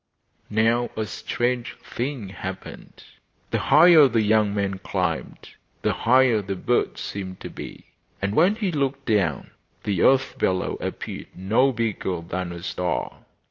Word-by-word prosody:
Now 115 Hz, +3 st, +2 dB
a 110 Hz, -, -1 dB
strange 120 Hz, +3 st, -2 dB
thing 125 Hz, -5 st, -5 dB
happened. 95 Hz, -1 st, -8 dB, 0.5 s
The -, -, +1 dB
higher 160 Hz, -2 st, +7 dB
the 115 Hz, -3 st, +1 dB
young 105 Hz, -1 st, +3 dB
man 100 Hz, -1 st, -2 dB
climbed 90 Hz, -4 st, -3 dB, 0.3 s
the -, -, +2 dB
higher 125 Hz, -2 st, +4 dB
the 100 Hz, 0 st, -4 dB
birds 120 Hz, +6 st, 0 dB
seemed 95 Hz, -2 st, -6 dB
to -, -, -7 dB
be, -, -, -9 dB, 0.3 s
and 100 Hz, +1 st, -1 dB
when 180 Hz, -, +4 dB
he 205 Hz, -4 st, -1 dB
looked 140 Hz, -2 st, -2 dB
down 95 Hz, -, 0 dB, 0.3 s
the 100 Hz, -4 st, -1 dB
earth 135 Hz, 0 st, +3 dB
below 95 Hz, 0 st, 0 dB
appeared -, -, -5 dB
no 110 Hz, +9 st, +2 dB
bigger 110 Hz, -7 st, -2 dB
than 90 Hz, +1 st, -4 dB
a 85 Hz, 0 st, -8 dB
star. 90 Hz, -9 st, -3 dB
110 Hz, 140 wpm, -24 LUFS, 95-130 Hz, 0.5 s, higher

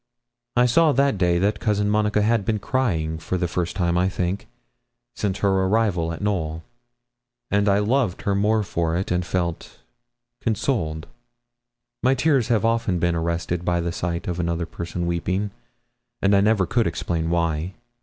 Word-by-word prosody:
I 125 Hz, 0 st, +5 dB
saw 150 Hz, +5 st, +4 dB
that 135 Hz, -5 st, +2 dB
day 85 Hz, -1 st, +3 dB
that 100 Hz, +3 st, +1 dB
Cousin 105 Hz, +1 st, +1 dB
Monica 105 Hz, 0 st, +2 dB
had 115 Hz, -1 st, +2 dB
been 110 Hz, +2 st, 0 dB
crying 85 Hz, -, -1 dB
for 85 Hz, +3 st, -2 dB
the 90 Hz, -1 st, 0 dB
first 85 Hz, 0 st, -2 dB
time, 85 Hz, -2 st, +1 dB
I 90 Hz, +1 st, +2 dB
think, 95 Hz, +1 st, -2 dB, 0.7 s
since 100 Hz, -2 st, -1 dB
her 100 Hz, -, +1 dB
arrival 95 Hz, -3 st, +1 dB
at 85 Hz, -, -6 dB
Knowl; 80 Hz, -6 st, -1 dB, 0.9 s
and 100 Hz, 0 st, +3 dB
I 100 Hz, -, +4 dB
loved 110 Hz, -1 st, 0 dB
her 100 Hz, -, +1 dB
more 105 Hz, +2 st, +2 dB
for 85 Hz, -3 st, -1 dB
it, 95 Hz, -, -3 dB
and 90 Hz, 0 st, +1 dB
felt 85 Hz, -2 st, -3 dB, 0.6 s
consoled. 95 Hz, -, -1 dB, 1.0 s
My 130 Hz, +2 st, +3 dB
tears 135 Hz, -3 st, +2 dB
have 115 Hz, -2 st, +2 dB
often 115 Hz, -5 st, +1 dB
been 85 Hz, 0 st, +1 dB
arrested 85 Hz, +1 st, -2 dB
by 90 Hz, 0 st, +1 dB
the 85 Hz, 0 st, -2 dB
sight 85 Hz, 0 st, -3 dB
of 90 Hz, -1 st, -2 dB
another 85 Hz, 0 st, -1 dB
person 85 Hz, +1 st, -5 dB
weeping, 90 Hz, +4 st, -1 dB, 0.7 s
and 100 Hz, +1 st, +3 dB
I 100 Hz, -, +5 dB
never 105 Hz, -2 st, +3 dB
could 115 Hz, +4 st, +1 dB
explain 80 Hz, 0 st, -2 dB
why. 85 Hz, +1 st, -1 dB
95 Hz, 165 wpm, -23 LUFS, 85-105 Hz, 1.0 s, I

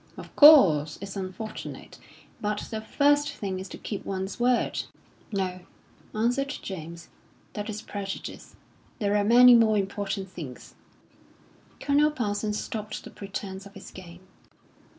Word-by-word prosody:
"Of -, -, -11 dB
course, 180 Hz, -, +7 dB
it's 200 Hz, 0 st, -7 dB
unfortunate; 195 Hz, +3 st, -7 dB, 0.4 s
but 210 Hz, 0 st, -2 dB
the 220 Hz, -1 st, -3 dB
first 290 Hz, +5 st, +2 dB
thing 190 Hz, -2 st, -4 dB
is 190 Hz, 0 st, -7 dB
to -, -, -8 dB
keep 205 Hz, -, -6 dB
one's 190 Hz, +2 st, -4 dB
word." 245 Hz, 0 st, +1 dB, 0.5 s
"No," 185 Hz, -3 st, -2 dB, 0.6 s
answered 245 Hz, +5 st, +1 dB, 0.2 s
James, 170 Hz, -2 st, -8 dB, 0.4 s
"that 210 Hz, +1 st, -5 dB
is 215 Hz, 0 st, -5 dB
prejudice. 195 Hz, -3 st, -7 dB, 0.4 s
There 205 Hz, -3 st, 0 dB
are 205 Hz, -, +3 dB
many 245 Hz, +3 st, +8 dB
more 225 Hz, -2 st, +5 dB
important 195 Hz, 0 st, -3 dB
things." 150 Hz, -9 st, -9 dB, 1.1 s
Colonel 290 Hz, +1 st, +3 dB
Parsons 210 Hz, -6 st, -2 dB
stopped 215 Hz, -1 st, -5 dB
the -, -, -11 dB
pretence 195 Hz, 0 st, -7 dB
of 200 Hz, -, -18 dB
his 195 Hz, -, -11 dB
game. 175 Hz, -1 st, -12 dB
205 Hz, 130 wpm, -27 LUFS, 190-225 Hz, 1.1 s, many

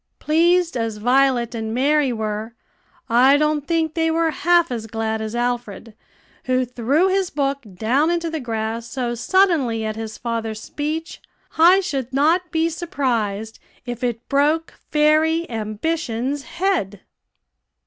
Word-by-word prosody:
Pleased 340 Hz, +2 st, +2 dB
as 225 Hz, -3 st, -2 dB
Violet 245 Hz, +1 st, +2 dB
and 220 Hz, -1 st, -4 dB
Mary 285 Hz, +1 st, +2 dB
were, 220 Hz, 0 st, -4 dB, 0.5 s
I 260 Hz, +4 st, +5 dB
don't 300 Hz, -1 st, 0 dB
think 325 Hz, -2 st, 0 dB
they 325 Hz, 0 st, +1 dB
were 325 Hz, 0 st, +1 dB
half 345 Hz, 0 st, +2 dB
as 225 Hz, -2 st, -4 dB
glad 220 Hz, 0 st, -2 dB
as 220 Hz, +1 st, -4 dB
Alfred, 240 Hz, -3 st, -3 dB, 0.5 s
who 255 Hz, 0 st, +1 dB
threw 250 Hz, +8 st, +1 dB
his 380 Hz, -1 st, +1 dB
book 280 Hz, -1 st, -1 dB, 0.2 s
down 255 Hz, -, +1 dB
into 340 Hz, -1 st, 0 dB
the 320 Hz, -, -3 dB
grass 225 Hz, -2 st, -3 dB
so 245 Hz, -2 st, -2 dB
suddenly 255 Hz, -, +2 dB
at 215 Hz, 0 st, -3 dB
his 220 Hz, -1 st, -6 dB
father's 225 Hz, -2 st, -3 dB
speech, 315 Hz, +7 st, -5 dB, 0.3 s
I 355 Hz, +4 st, +6 dB
should 270 Hz, -8 st, -3 dB
not 320 Hz, +6 st, +2 dB
be 320 Hz, 0 st, +1 dB
surprised 240 Hz, -, -2 dB, 0.3 s
if 245 Hz, 0 st, -6 dB
it 235 Hz, -1 st, -2 dB
broke 300 Hz, +4 st, +1 dB, 0.2 s
fairy 310 Hz, +2 st, +3 dB
Ambition's 240 Hz, +4 st, -2 dB
head. 340 Hz, -, -1 dB
265 Hz, 140 wpm, -21 LUFS, 225-320 Hz, 0.5 s, I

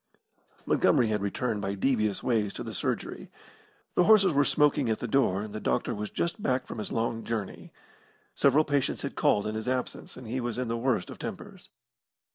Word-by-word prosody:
Montgomery 115 Hz, -, +3 dB
had 105 Hz, -2 st, 0 dB
returned 105 Hz, +2 st, -2 dB
by 100 Hz, 0 st, -2 dB
devious 110 Hz, -2 st, 0 dB
ways 110 Hz, -5 st, +1 dB
to -, -, -6 dB
the -, -, -6 dB
surgery. -, -, -3 dB, 0.6 s
The 180 Hz, -, +3 dB
horses 200 Hz, -5 st, +6 dB
were 145 Hz, 0 st, +4 dB
smoking 145 Hz, -3 st, +3 dB
at 110 Hz, -, +1 dB
the 120 Hz, -, -4 dB
door, 105 Hz, -6 st, +2 dB
and 105 Hz, -1 st, -8 dB
the 110 Hz, -, -4 dB
doctor 120 Hz, -, 0 dB
was 105 Hz, -1 st, -4 dB
just 170 Hz, +5 st, -2 dB
back 130 Hz, -5 st, 0 dB
from -, -, -7 dB
his 105 Hz, -, -5 dB
long 115 Hz, 0 st, -1 dB
journey. 110 Hz, -4 st, -5 dB, 0.6 s
Several 140 Hz, +3 st, +4 dB
patients 145 Hz, -3 st, 0 dB
had -, -, -3 dB
called 105 Hz, -, +2 dB
in 105 Hz, -, -2 dB
his 110 Hz, +2 st, -4 dB
absence, 130 Hz, 0 st, -3 dB
and 130 Hz, -, -9 dB
he 120 Hz, +4 st, -3 dB
was 120 Hz, -1 st, -3 dB
in 125 Hz, -2 st, -2 dB
the 115 Hz, -, 0 dB
worst 115 Hz, -4 st, 0 dB
of -, -, -10 dB
tempers. -, -, -8 dB
115 Hz, 200 wpm, -28 LUFS, 105-135 Hz, 0.6 s, horses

